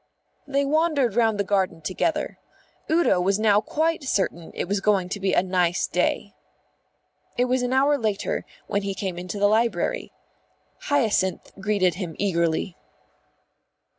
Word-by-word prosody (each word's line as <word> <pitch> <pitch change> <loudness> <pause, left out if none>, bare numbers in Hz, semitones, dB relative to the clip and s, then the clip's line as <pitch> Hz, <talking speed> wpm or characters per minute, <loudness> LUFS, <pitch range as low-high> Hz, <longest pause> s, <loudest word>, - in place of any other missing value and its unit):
They 280 0 +1
wandered 295 -5 +2
round 225 -2 +2
the - - +2
garden 190 -4 0
together. 300 - -2 0.5
Udo 320 - +3
was 195 +2 +2
now 210 -1 +4
quite 320 +3 -1
certain 190 -9 -1
it - - -3
was 200 +1 -1
going 195 -3 +2
to 200 - -4
be 190 -1 0
a - - +3
nice 180 -1 +1
day. - - -1 1.0
It 245 - +3
was 255 0 +1
an 245 0 -1
hour 280 +2 +3
later 215 -3 -1 0.2
when 200 - -1
he 195 -1 -3
came 185 -3 -4
into 180 +3 -5
the 205 - +2
library. 230 - 0 0.7
Hyacinth 220 -9 +1
greeted 195 -3 +1
him 165 -4 -5
eagerly. 170 -2 0
205 Hz, 145 wpm, -24 LUFS, 185-255 Hz, 1.0 s, now